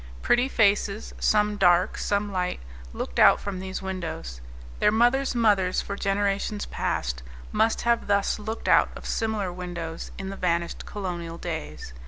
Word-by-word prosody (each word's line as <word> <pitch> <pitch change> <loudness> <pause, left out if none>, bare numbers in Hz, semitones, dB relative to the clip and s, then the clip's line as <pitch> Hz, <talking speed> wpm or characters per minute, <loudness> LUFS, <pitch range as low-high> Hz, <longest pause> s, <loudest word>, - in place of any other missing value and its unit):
Pretty 250 +2 +3
faces, 205 -2 +1
some 210 -1 +2
dark, 180 -2 +4
some 205 0 -1
light, 180 -1 -1 0.3
looked 65 - -4
out - - +7
from 195 -2 -5
these 190 0 -5
windows; 165 - -5 0.4
their - - +4
mothers' 245 +4 +2
mothers, 205 -6 +3
for 200 - -4
generations 200 +1 -1
past, - - -2 0.3
must 225 +1 +1
thus 205 -4 +2
have 210 - -11
looked 220 +1 -4
out - - +5
of - - -10
similar 215 -5 -1
windows 175 -2 -6
in 190 -1 -5
the - - -6
vanished 170 -2 -1
colonial 175 -4 -5
days. 75 - -6
195 Hz, 150 wpm, -26 LUFS, 175-210 Hz, 0.4 s, out